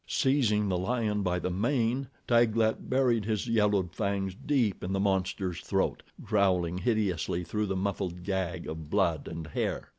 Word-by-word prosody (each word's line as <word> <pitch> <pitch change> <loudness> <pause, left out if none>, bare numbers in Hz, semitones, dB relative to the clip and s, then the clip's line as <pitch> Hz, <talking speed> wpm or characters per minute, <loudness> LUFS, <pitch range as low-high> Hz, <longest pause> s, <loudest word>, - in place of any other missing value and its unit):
Seizing 120 -8 +2
the 90 -2 0
lion 105 0 0
by 90 -2 0
the 90 +1 -2
mane, 120 +5 0 0.2
Taglat 115 -2 +2
buried 125 -4 +2
his 110 -1 -1
yellowed 105 -6 +2
fangs 100 -2 -1
deep 120 -2 0
in 95 - -2
the 95 - 0
monster's 95 -2 0
throat, 95 -1 0 0.2
growling 90 -5 +1
hideously 95 -7 0
through 105 +5 -2
the 95 - -1
muffled 95 -2 -2
gag 95 -3 -2
of 80 -1 -6
blood 85 -5 +1
and 80 -1 -6
hair. 75 - -3
100 Hz, 155 wpm, -29 LUFS, 90-110 Hz, 0.2 s, Seizing